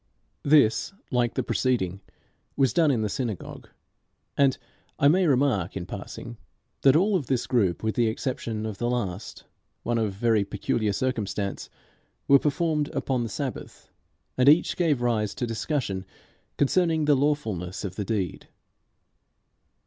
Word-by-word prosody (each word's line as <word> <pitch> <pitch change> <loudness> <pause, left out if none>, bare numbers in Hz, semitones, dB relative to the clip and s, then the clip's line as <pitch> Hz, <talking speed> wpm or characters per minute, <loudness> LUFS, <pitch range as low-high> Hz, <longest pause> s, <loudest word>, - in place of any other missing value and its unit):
This, 140 - +3 0.2
like 120 -2 +1
the - - 0
preceding, 100 -8 0 0.6
was 135 -5 +3
done 165 -3 +4
in 120 -6 +1
the - - 0
synagogue. 110 -2 -5 0.7
And 135 -2 +3 0.4
I 140 - +4
may 180 +4 +4
remark, 125 - +1
in 85 - -5
passing, 110 +5 -8 0.4
that 135 0 +5
all 195 +5 +3
of 150 -9 -1
this 130 -3 0
group, 100 -9 +1
with 110 0 0
the 120 -2 +2
exception 110 -2 -3
of 105 -3 -5
the 120 - 0
last 105 -5 -4 0.4
one 120 0 0
of 105 -3 -1
very 110 +1 +2
peculiar 105 +2 -1
circumstance 105 -4 -2 0.6
were 140 0 +7
performed 150 0 0
upon 135 -2 0
the 115 - -3
Sabbath, 130 +5 -6 0.5
and 130 +2 +6
each 155 +4 +4
gave 150 -8 +1
rise 110 -4 0
to 125 - -2
discussion 115 -5 -2 0.5
concerning 160 +1 +2
the 150 - +5
lawfulness 120 - -1
of 95 -2 -5
the 105 - -2
deed. 100 -6 -3
120 Hz, 145 wpm, -26 LUFS, 105-140 Hz, 0.7 s, were